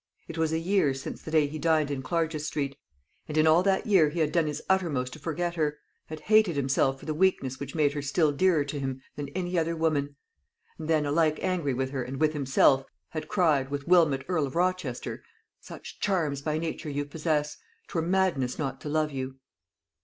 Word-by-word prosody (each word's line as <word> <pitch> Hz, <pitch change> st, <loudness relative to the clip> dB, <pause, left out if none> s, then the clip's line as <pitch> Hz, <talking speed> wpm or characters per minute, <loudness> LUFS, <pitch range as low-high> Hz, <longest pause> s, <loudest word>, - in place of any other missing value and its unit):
It 165 Hz, -, -7 dB
was 160 Hz, -1 st, 0 dB
a 160 Hz, -, +1 dB
year 165 Hz, -5 st, +2 dB
since 135 Hz, -, -7 dB
the -, -, -8 dB
day 155 Hz, -2 st, +4 dB
he 150 Hz, +2 st, -5 dB
dined 155 Hz, -2 st, +2 dB
in 135 Hz, -2 st, -2 dB
Clarges 160 Hz, +1 st, -1 dB
street; 140 Hz, -2 st, -2 dB, 0.5 s
and 150 Hz, -, -4 dB
in 155 Hz, -, +5 dB
all 160 Hz, +2 st, +6 dB
that 190 Hz, +2 st, +1 dB
year 190 Hz, -9 st, +5 dB
he 170 Hz, +3 st, -4 dB
had 155 Hz, -2 st, +2 dB
done 165 Hz, -3 st, +2 dB
his 150 Hz, -, -3 dB
uttermost 150 Hz, -10 st, 0 dB
to -, -, -10 dB
forget 170 Hz, +3 st, -2 dB
her, 150 Hz, -3 st, -1 dB, 0.3 s
had 155 Hz, 0 st, -7 dB
hated 215 Hz, -6 st, +4 dB
himself 135 Hz, -1 st, +1 dB
for -, -, -12 dB
the 155 Hz, -, -2 dB
weakness 150 Hz, -7 st, +1 dB
which 140 Hz, +1 st, -6 dB
made 145 Hz, -3 st, +2 dB
her 145 Hz, -, -3 dB
still 150 Hz, +2 st, +2 dB
dearer 160 Hz, 0 st, +2 dB
to 145 Hz, 0 st, -4 dB
him 135 Hz, -1 st, -4 dB
than 145 Hz, -1 st, -5 dB
any 180 Hz, -1 st, 0 dB
other 165 Hz, +1 st, -1 dB
woman; 145 Hz, -3 st, 0 dB, 0.6 s
and 155 Hz, -, -5 dB
then, 155 Hz, -2 st, +2 dB
alike 155 Hz, +1 st, +2 dB
angry 170 Hz, -8 st, 0 dB
with 130 Hz, +1 st, -2 dB
her 135 Hz, -2 st, -2 dB
and 130 Hz, +2 st, -5 dB
with 155 Hz, -1 st, +2 dB
himself, 135 Hz, -1 st, +3 dB, 0.3 s
had 155 Hz, -, -5 dB
cried, 150 Hz, -8 st, +2 dB
with 140 Hz, +1 st, -4 dB
Wilmot 160 Hz, -7 st, +4 dB
Earl 160 Hz, -6 st, +1 dB
of 135 Hz, -, -9 dB
Rochester, 180 Hz, -8 st, -1 dB, 0.4 s
"Such -, -, -11 dB
charms 160 Hz, -9 st, 0 dB
by 155 Hz, +1 st, -1 dB
nature 160 Hz, -1 st, -4 dB
you 145 Hz, 0 st, -2 dB
possess, 150 Hz, 0 st, -1 dB, 0.3 s
'Twere 165 Hz, -, -1 dB
madness 170 Hz, -8 st, +1 dB
not 135 Hz, -3 st, -3 dB
to 150 Hz, -, -5 dB
love 155 Hz, 0 st, +1 dB
you." 130 Hz, -1 st, -4 dB
155 Hz, 210 wpm, -28 LUFS, 140-165 Hz, 0.6 s, all